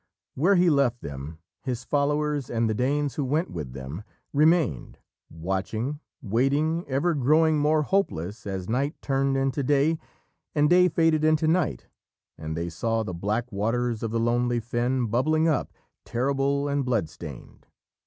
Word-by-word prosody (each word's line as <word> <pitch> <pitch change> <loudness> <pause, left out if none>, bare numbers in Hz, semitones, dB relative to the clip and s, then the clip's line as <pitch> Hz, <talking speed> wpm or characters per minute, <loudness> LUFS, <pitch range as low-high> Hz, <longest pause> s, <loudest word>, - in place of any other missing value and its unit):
Where 180 +9 +3
he 175 -1 +4
left 130 -4 +2
them, 70 +3 -7 0.2
his 130 -1 -4
followers, 145 -1 0
and 115 -1 0
the 110 - 0
Danes 140 +4 0
who 145 - -2
went 150 +7 0
with 75 -7 -6
them, 70 +7 -7 0.3
remained, 150 - +2 0.3
watching, 95 - -3 0.2
waiting, 140 - +1
ever 140 +6 +1
growing 155 +3 +3
more 150 +1 +3
hopeless 105 - -1
as 95 -2 -4
night 135 +6 -1
turned 135 0 +1
into 135 +1 0
day, 145 +4 +2 0.6
and 150 0 +4
day 180 0 +6
faded 160 -2 +2
into 155 0 +3
night, 160 - +1 0.5
and 80 0 -5
they 85 +1 -2
saw 115 +7 -1
the 95 - -5
black 105 +8 -2
waters 115 +3 -1
of 115 - -2
the 115 +1 -1
lonely 120 +1 +1
fen 120 +2 -1
bubbling 155 +8 +2
up, 155 - 0 0.3
terrible 140 +3 0
and 140 -1 0
blood 115 -9 0
stained. 75 -5 -11
130 Hz, 155 wpm, -26 LUFS, 110-150 Hz, 0.6 s, day